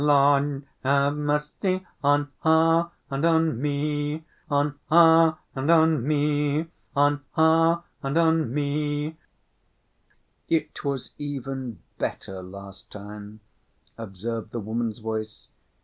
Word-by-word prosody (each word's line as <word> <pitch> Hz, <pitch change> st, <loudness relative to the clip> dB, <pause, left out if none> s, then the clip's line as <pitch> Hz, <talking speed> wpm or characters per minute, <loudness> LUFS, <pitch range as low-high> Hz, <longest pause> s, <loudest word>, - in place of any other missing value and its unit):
Lord 145 Hz, -1 st, +3 dB, 0.2 s
have 140 Hz, +1 st, +3 dB
mercy 150 Hz, +6 st, -1 dB, 0.2 s
On 145 Hz, 0 st, +2 dB
her 165 Hz, +1 st, +4 dB, 0.2 s
and 135 Hz, +2 st, -2 dB
on 160 Hz, -6 st, +2 dB
me! 150 Hz, +1 st, -2 dB, 0.2 s
On 145 Hz, 0 st, +1 dB, 0.2 s
her 165 Hz, -1 st, +6 dB, 0.2 s
and 135 Hz, +3 st, -2 dB
on 160 Hz, -5 st, +4 dB
me! 150 Hz, +1 st, +1 dB, 0.3 s
On 145 Hz, 0 st, +2 dB
her 165 Hz, +1 st, +4 dB, 0.2 s
and 135 Hz, +3 st, -1 dB
on 160 Hz, -5 st, +3 dB
me! 145 Hz, +2 st, -2 dB, 1.3 s
"It 155 Hz, -2 st, -1 dB
was 140 Hz, -3 st, -3 dB
even 135 Hz, -, -5 dB, 0.2 s
better 95 Hz, -1 st, -4 dB
last 100 Hz, +1 st, -11 dB
time," 105 Hz, +1 st, -10 dB, 0.5 s
observed 110 Hz, +1 st, -5 dB
the 120 Hz, -, -4 dB
woman's 110 Hz, +1 st, -3 dB
voice. 110 Hz, -1 st, -5 dB
145 Hz, 105 wpm, -25 LUFS, 125-160 Hz, 1.3 s, her